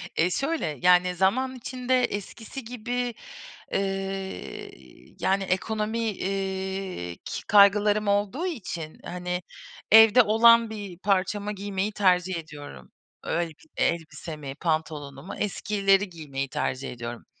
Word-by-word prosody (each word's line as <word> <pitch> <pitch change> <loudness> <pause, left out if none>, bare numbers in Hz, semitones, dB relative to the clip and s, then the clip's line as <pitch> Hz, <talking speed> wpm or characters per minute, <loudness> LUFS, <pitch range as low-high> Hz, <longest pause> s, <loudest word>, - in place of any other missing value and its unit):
E, 165 +2 +3
şöyle, 275 - -1
yani 180 0 +5
zaman 245 +9 +1
içinde, 255 +1 0
eskisi 225 +5 -5
gibi, 245 +1 -3 0.6
ııı, 195 0 -3 0.5
yani 195 +1 +1
ekonomi, 215 +4 -1
eee, 190 - -3
ki - - -5
kaygılarım 205 +1 +5
olduğu 205 - +1
için, 180 - -5
hani, 180 0 -3 0.5
evde 225 +2 +9
olan 230 +1 +6
bir 205 -5 -7
parçamı 200 +1 0
giymeyi 200 0 -2
tercih 185 -3 +2
ediyorum. 145 - -9 0.3
Öyle 170 0 -1
bir 160 0 -19
elbisemi, 155 -3 -2
pantolonumu, 155 -1 -3
eskileri 200 -1 +1
giymeyi, 140 -5 -5
tercih 130 +1 -2
ediyorum. 120 -1 -7
195 Hz, 105 wpm, -26 LUFS, 170-215 Hz, 0.6 s, evde